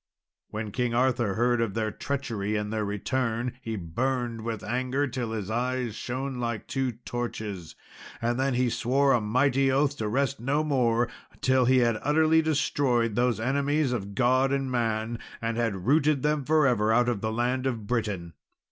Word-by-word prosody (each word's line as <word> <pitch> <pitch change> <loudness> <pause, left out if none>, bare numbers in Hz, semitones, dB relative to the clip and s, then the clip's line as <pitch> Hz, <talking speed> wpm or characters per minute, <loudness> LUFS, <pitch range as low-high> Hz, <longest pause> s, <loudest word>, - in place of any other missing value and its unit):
When 110 -1 -4
King 125 +1 -1
Arthur 120 -5 +1
heard 120 +1 +2
of 110 -4 -1
their 110 -1 -1
treachery 110 -6 -3
and 105 0 -2
their 110 -1 0
return, 115 +4 -2
he 115 -3 -4
burned 120 +6 -2
with 110 -1 -4
anger 130 +4 0
till 120 -3 -3
his 110 -2 -4
eyes 125 0 -1
shone 130 +3 -4
like 115 -3 -3
two 130 -2 -1
torches, 110 -7 -5 0.4
and 120 +2 -1
then 135 -1 +1
he 125 0 +2
swore 130 +4 +2
a 120 - +2
mighty 135 +5 +2
oath 140 +1 +2
to 110 - -2
rest 135 +5 0
no 140 +5 0
more 120 -5 +2 0.2
until 130 -1 +2
he 130 +1 +4
had 115 -2 +1
utterly 160 +2 +4
destroyed 135 -6 +1
those 120 +1 +1
enemies 140 +3 +1
of 100 -5 -4
God 130 +3 +3
and 135 -1 -1
man, 115 -1 -1 0.2
and 115 0 -2
had 105 -6 -1
rooted 145 +1 +3
them 150 -2 +1
for 155 0 +4
ever 110 -4 +2
out 120 +2 +3
of 120 -5 -1
the 110 - -1
land 125 +3 0
of 115 -5 -3
Britain. 100 -7 -2
120 Hz, 175 wpm, -27 LUFS, 110-135 Hz, 0.4 s, he